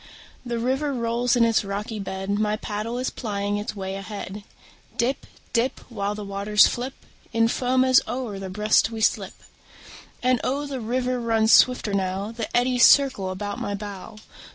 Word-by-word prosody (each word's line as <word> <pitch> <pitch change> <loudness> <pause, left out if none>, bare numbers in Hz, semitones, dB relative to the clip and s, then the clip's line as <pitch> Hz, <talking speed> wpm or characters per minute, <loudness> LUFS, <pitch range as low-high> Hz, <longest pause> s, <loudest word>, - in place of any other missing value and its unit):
The 240 -2 -3
river 265 +5 0
rolls 235 +1 +1
in 235 -1 +4
its 225 -2 +2
rocky 205 +2 -4
bed; 195 0 -4
My 210 +1 +1
paddle 215 +3 -4
is 255 +1 -2
plying 205 -3 -2
its 205 +1 -4
way 190 -1 -4
ahead; 200 0 -7 0.5
Dip, 260 +4 -1 0.3
dip, 250 +2 +1
While 205 -2 -2
the 210 -1 -6
waters 200 +1 +4
flip 255 +2 -2 0.4
In 230 0 +3
foam 255 +2 +1
as 255 -1 +6
over 235 -4 -4
their 190 -1 -6
breast 210 +3 +2
we 225 -1 -6
slip. - - +1 0.9
And 255 -2 +2
oh, 280 +3 -1
the 270 -3 -5
river 250 +2 -1
runs 225 -1 +2
swifter 250 -5 +5
now; 195 +2 -1
The 230 -1 -5
eddies 245 0 +3
circle 260 -9 +5
about 205 +2 -4
my 205 - -3
bow. 200 0 -8
220 Hz, 170 wpm, -24 LUFS, 205-245 Hz, 0.9 s, as